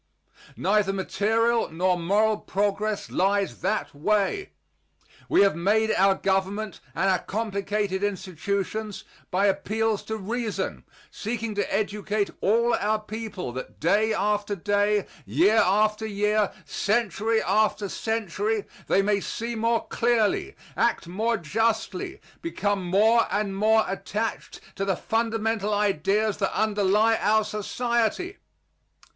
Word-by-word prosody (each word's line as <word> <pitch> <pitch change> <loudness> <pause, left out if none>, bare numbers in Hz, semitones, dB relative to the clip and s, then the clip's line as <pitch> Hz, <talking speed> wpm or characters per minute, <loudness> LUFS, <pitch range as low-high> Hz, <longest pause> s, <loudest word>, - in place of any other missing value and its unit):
Neither 205 0 +2
material 225 +4 +1
nor 180 +3 +1
moral 205 +5 +2
progress 205 +1 -1
lies 200 +1 0
that 215 - -1
way. 210 - 0 0.8
We - - +5
have 200 -5 +3
made 215 +6 +2
our 195 0 +4
Government 195 +2 -1 0.2
and 195 - +1
our 185 -2 +3
complicated 200 -1 -2
institutions 200 +2 -3 0.3
by 190 +3 +2
appeals 210 +2 0
to 220 - -3
reason, 220 +2 -3 0.3
seeking 225 0 -3
to 205 -1 -2
educate 205 0 -1
all 235 +4 +3
our 215 +1 +1
people 215 - -6
that, 130 +2 -8
day 210 +6 +2
after 205 0 0
day, 205 +2 +1 0.2
year 170 - +3
after 215 +3 +2
year, 210 0 +1
century 220 +1 0
after 210 +1 +1
century, 215 0 -2 0.2
they 195 - +3
may 205 0 +2
see 230 +4 -4
more 230 +1 0
clearly, 240 - +1 0.2
act - - +1
more 220 +6 0
justly, 220 - -1 0.2
become 205 - -1
more 215 +6 +4
and 200 -1 -1
more 220 +2 +3
attached 210 +3 -4 0.2
to 195 - -1
the 195 -1 0
fundamental 225 -2 -1
ideas 205 +1 +1
that 195 -2 -1
underlie 210 +1 +3
our 215 +2 +3
society. 235 - -1
210 Hz, 120 wpm, -25 LUFS, 195-220 Hz, 0.8 s, We